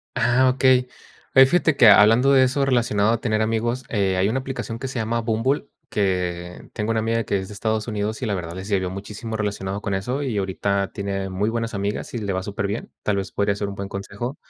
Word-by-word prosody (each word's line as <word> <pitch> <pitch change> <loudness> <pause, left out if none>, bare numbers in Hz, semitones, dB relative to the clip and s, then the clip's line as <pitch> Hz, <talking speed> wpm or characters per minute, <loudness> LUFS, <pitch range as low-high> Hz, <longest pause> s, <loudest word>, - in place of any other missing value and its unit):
Ah, 125 +1 +3
okey. 130 -1 +3 0.5
Oye, 135 - +9
fíjate 160 0 +2
que 115 - +7
hablando 115 +6 +7
de 130 -1 +6
eso 130 +2 +1
relacionado 115 -5 +2
a 115 - 0
tener 110 -1 0
amigos, 120 +3 -1
eh, 95 -4 +1
hay 95 +1 +2
una 120 +5 0
aplicación 130 -3 -5
que 135 - -4
se 130 - -6
llama 115 +1 -1
Bumble, 115 +6 0 0.2
que 90 -3 -2
tengo 105 0 -3
una 110 - +1
amiga 115 +1 0
que 100 - 0
es 95 0 -5
de 105 - -9
Estados 110 +1 -2
Unidos 105 +1 -3
y - - -1
la 105 - -1
verdad 85 -3 -4
les 95 +3 -7
ayudó 95 -2 +1
muchísimo 105 +4 -6
relacionado 100 -1 -3
con 100 - -2
eso 125 +9 -2
y 120 -6 -2
ahorita 100 +1 -1
tiene 100 -1 -3
muy 100 +4 -1
buenas 115 -1 -3
amigas 100 +1 -3
y - - -2
le 100 -4 -2
va 95 - -1
superbién. 100 +2 -4
Tal 105 -1 0
vez 95 -1 -3
podría 100 0 0
ser 100 0 -3
un 100 - -7
buen 100 0 -5
consejo. 100 +8 -5
110 Hz, 230 wpm, -23 LUFS, 100-120 Hz, 0.5 s, Oye